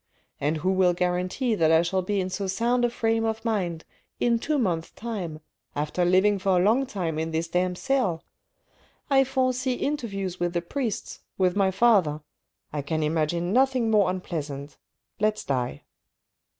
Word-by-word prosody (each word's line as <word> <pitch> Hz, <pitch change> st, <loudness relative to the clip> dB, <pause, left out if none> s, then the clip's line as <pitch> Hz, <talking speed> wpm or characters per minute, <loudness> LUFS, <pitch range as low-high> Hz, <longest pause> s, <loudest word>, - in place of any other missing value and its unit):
And 150 Hz, +3 st, 0 dB
who 185 Hz, +5 st, 0 dB
will 185 Hz, -2 st, +3 dB
guarantee 180 Hz, +7 st, 0 dB
that 160 Hz, -6 st, +3 dB
I 165 Hz, +1 st, +5 dB
shall 185 Hz, +2 st, 0 dB
be 200 Hz, +2 st, -1 dB
in 185 Hz, 0 st, -2 dB
so 200 Hz, +1 st, -2 dB
sound 235 Hz, +6 st, +1 dB
a 240 Hz, -, +3 dB
frame 225 Hz, -1 st, 0 dB
of 225 Hz, 0 st, -2 dB
mind 180 Hz, -7 st, -1 dB, 0.3 s
in 235 Hz, -1 st, +2 dB
two 300 Hz, +5 st, 0 dB
months' 175 Hz, -10 st, 0 dB
time, 190 Hz, -9 st, -5 dB, 0.3 s
after 150 Hz, +4 st, -1 dB
living 190 Hz, +3 st, +4 dB
for 190 Hz, -1 st, +2 dB
a -, -, +3 dB
long 240 Hz, +7 st, +3 dB
time 170 Hz, -8 st, -3 dB
in 160 Hz, 0 st, -2 dB
this 160 Hz, +1 st, -1 dB
damp 180 Hz, +1 st, 0 dB
cell? 250 Hz, -12 st, 0 dB, 0.9 s
I 270 Hz, -1 st, +6 dB
foresee 255 Hz, -1 st, 0 dB
interviews 195 Hz, -11 st, -3 dB
with 175 Hz, 0 st, -1 dB
the 175 Hz, -, 0 dB
priests, 230 Hz, +3 st, -3 dB, 0.2 s
with 185 Hz, -2 st, +2 dB
my 195 Hz, -2 st, +3 dB
father. 190 Hz, -7 st, +3 dB, 0.5 s
I 150 Hz, -, -1 dB
can 155 Hz, +2 st, -2 dB
imagine 165 Hz, +4 st, 0 dB
nothing 255 Hz, -2 st, +3 dB
more 205 Hz, -4 st, +4 dB
unpleasant. 150 Hz, -6 st, -5 dB, 0.4 s
Let's 215 Hz, +1 st, +1 dB
die." 125 Hz, -, -2 dB
185 Hz, 165 wpm, -26 LUFS, 170-225 Hz, 0.9 s, I